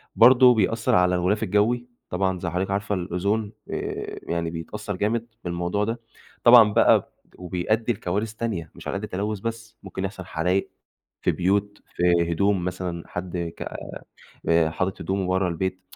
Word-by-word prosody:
برضه 125 +1 +8
بيأثر 110 +1 +2
على 90 0 +4
الغلاف 90 +4 +1
الجوي، 120 +4 +1 0.2
طبعًا 95 0 0
زَي 85 - -3
حضرتِك 90 +3 -2
عارفة 100 +1 -1
الأُوزون 100 +4 -1 0.2
آآ - - -4
يعني 85 -1 -2
بيتأثر 85 +5 -5
جامد 110 +4 -1 0.2
بالموضوع 90 +3 -1
ده، 115 +3 -2 0.4
طبعًا 120 -3 +8
بقى - - +4 0.2
وبيأدي 90 +7 -1
لكوارث 105 +3 -2
تانية 105 -9 -4
مش - - -10
على - - -1
قَد 100 - -7
التلوث 105 +1 -3
بس، 115 +1 -6
ممكن 95 0 -4
يحصل 95 -2 -6
حرايق، 90 +3 -1 0.5
في - - +2
بيوت، 100 +3 0
في 85 -1 +3
هدوم 100 +1 +1
مثلًا، 90 -2 -4
حد 90 0 -5 0.2
ك - - -12 0.9
آآ 85 -1 +4
حاطط 95 +4 -2
هدومه 95 -1 -1
ورّا 95 0 +1
البيت 95 +2 -3
95 Hz, 155 wpm, -24 LUFS, 90-105 Hz, 0.9 s, برضه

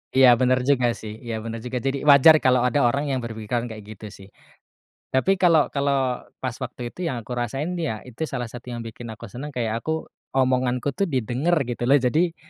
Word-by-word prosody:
Iya, 130 -2 +7
benar 130 +1 +2
juga 125 -4 +3
sih, 110 -1 -7
iya 115 -2 -4
benar 115 +1 -6
juga, 125 0 -3
jadi, 135 +2 -2
wajar 145 +2 +8
kalau 130 -1 +4
ada 145 +1 +2
orang 140 +5 +1
yang 130 -3 -1
berpikiran 115 +1 -3
kayak 110 0 -9
gitu, 105 - -11
sih. 95 0 -13 0.8
Tapi, 185 +8 +1
kalau 165 -5 +4
kalau 140 -3 0 0.2
pas 125 - -1
waktu 120 -1 -6
itu 175 -2 -3
yang 130 - -3
aku 125 - -7
rasain 135 +8 -2
ya 110 -10 -3
itu 130 +6 -5
salah 125 -2 -3
satu 125 0 -10
yang 120 -1 -5
bikin 115 +1 -8
aku 110 +1 -9
senang, 140 +5 -6
kayak 115 -4 -2
aku, 160 0 -2 0.3
omonganku 130 +1 +1
tuh 195 +6 -1
didengar 130 +6 0
gitu, 120 0 -3
loh, 140 - +7
jadi, 155 +7 +1
125 Hz, 200 wpm, -24 LUFS, 120-140 Hz, 0.8 s, wajar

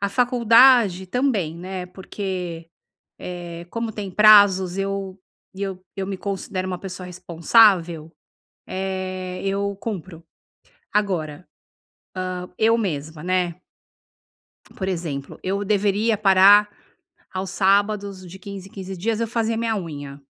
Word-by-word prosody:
a 200 - 0
faculdade 235 -4 +4
também, 205 - 0
né, 180 +1 -6
porque, 180 -3 -6 0.5
eh, 175 -1 -7
como 230 -1 -3
tem 200 -2 -6
prazos, 200 -3 +6
eu 195 -1 -3 0.4
eu 190 -1 -5
eu 195 -1 -3
me 195 - -4
considero 190 -1 -4
uma 180 - -3
pessoa 180 -1 -7
responsável, 175 -2 +3 0.6
eh, 185 -1 -4
eu 200 0 -1
cumpro, 185 -5 -7 0.7
agora, 180 -6 -2 0.9
hã, 180 0 -6
eu 225 +1 +3
mesma, 160 -6 -4
né 180 -2 0 1.2
por 190 - -4
exemplo, 160 -7 -4
eu 200 +2 -1
deveria 205 +2 +1
parar 200 +1 +6 0.6
aos 185 0 -4
sábados, 200 0 +1
de 180 +2 -11
15 195 0 -9
em - - -26
15 190 -1 -7
dias, 220 +5 -1
eu 230 - 0
fazia 225 0 -1
minha 225 -1 -1
unha 145 -6 -7
190 Hz, 120 wpm, -22 LUFS, 180-205 Hz, 1.2 s, prazos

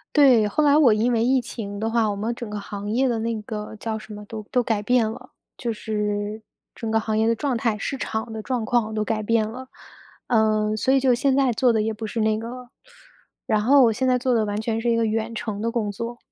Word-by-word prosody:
对， 255 -7 +6
后 300 +9 +1
来 290 0 +5
我 255 -8 +6
因 230 +4 +1
为 225 0 +2
疫 260 +2 +3
情 205 -4 -6
的 225 +1 -1
话， 225 -2 +2
我 200 - -2
们 220 +4 -2
整 235 -2 -7
个 210 0 -4
行 205 0 -6
业 255 +4 +2
的 235 -2 0
那 225 -1 -2
个 210 0 -6
叫 220 0 -4
什 215 0 -11
么？ 210 0 -9
都 220 0 -7
都 250 -2 +2
改 220 -3 0
变 235 0 +2
了， - - -9 0.3
就 235 -2 -2
是 210 0 -3 0.3
整 225 -2 -5
个 220 0 +2
行 215 0 -2
业 220 +1 +2
的 230 - +2
状 265 +1 -1
态、 225 -2 0
市 270 +6 -3
场 220 -2 -4
的 220 - -5
状 245 -1 -2
况 220 -2 0
都 215 - 0
改 215 -1 -1
变 220 0 +1
了。 255 +3 -8 0.6
呃， 215 -2 +2
所 260 +4 +1
以 270 - +5
就 260 -2 +3
现 265 +2 +2
在 270 -3 +3
做 245 +2 +3
的 220 -1 +1
也 220 +1 -1
不 220 0 -6
是 225 +1 -2
那 215 0 +2
个 230 +1 -6
了， 250 0 -9 0.8
然 215 -1 +1
后 270 +4 +6
我 225 -2 +4
现 260 +3 -1
在 250 0 +3
做 250 0 0
的 225 -2 +2
完 205 0 -2
全 225 0 -2
是 240 - 0
一 230 - +3
个 230 0 +2
远 225 +1 -2
程 215 -3 -4
的 230 - 0
工 215 -4 -1
作。 230 +4 -6
225 Hz, 280 characters per minute, -23 LUFS, 215-240 Hz, 0.8 s, 对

